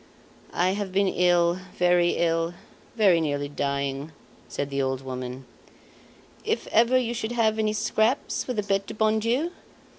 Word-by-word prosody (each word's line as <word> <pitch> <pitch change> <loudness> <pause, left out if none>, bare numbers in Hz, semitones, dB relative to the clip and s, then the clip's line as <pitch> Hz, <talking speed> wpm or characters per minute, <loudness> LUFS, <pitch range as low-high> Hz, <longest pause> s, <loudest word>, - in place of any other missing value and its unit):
"I 180 +2 +1
have 200 -1 -3
been 195 0 +1 0.6
very 175 -1 +4
ill, 165 0 +1 0.4
very 195 -7 +4
nearly 145 -2 -1
dying," 140 +1 -2 0.4
said 140 0 -4
the 140 0 0
old 130 -1 -1
woman. 130 0 -6 1.0
"If - - -1
ever 235 +3 +4
you 240 -2 0
should 225 0 -3
have 220 -2 +1
any 215 -1 +1
scraps 220 +4 0
for 250 - -4
the 210 -3 -1
Bete 195 0 -1
du - - -7
Bon 220 0 +2
Dieu 250 +10 0
190 Hz, 150 wpm, -25 LUFS, 145-220 Hz, 1.0 s, very